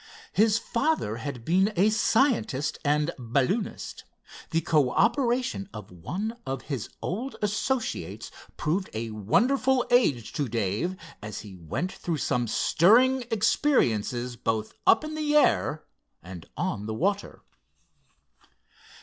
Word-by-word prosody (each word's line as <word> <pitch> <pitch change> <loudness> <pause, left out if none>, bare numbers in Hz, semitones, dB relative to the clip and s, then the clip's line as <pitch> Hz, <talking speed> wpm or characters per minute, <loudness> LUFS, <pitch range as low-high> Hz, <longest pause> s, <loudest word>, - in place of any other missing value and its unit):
His 215 0 +4
father 235 - -1
had 120 -1 -6
been 190 +5 +3
a 205 +4 +4
scientist 220 - +1
and 150 +2 +2
balloonist. 140 - -1 0.5
The 165 -1 +1
cooperation 230 - +1
of 105 -3 -9
one 195 - -4
of 135 -1 -4
his 135 -8 -4
old 235 +10 -3
associates 220 +4 -2 0.3
proved 185 +6 -1
a 115 0 -3
wonderful 250 - +2
aid 145 - +3
to 145 -5 -2
Dave, 115 - -1 0.3
and 105 -1 -7
he 100 -2 -8
went 90 - -3
through 170 -3 -3
some 120 -4 0
stirring 245 - +4
experiences 125 - +1
both 110 -1 -2
up - - +6
in 310 0 -5
the 300 -1 0
air 155 - +3 0.4
and 85 -2 -10
on 105 +1 -2
the 110 - -3
water. 200 - -1
170 Hz, 120 wpm, -27 LUFS, -, 0.5 s, up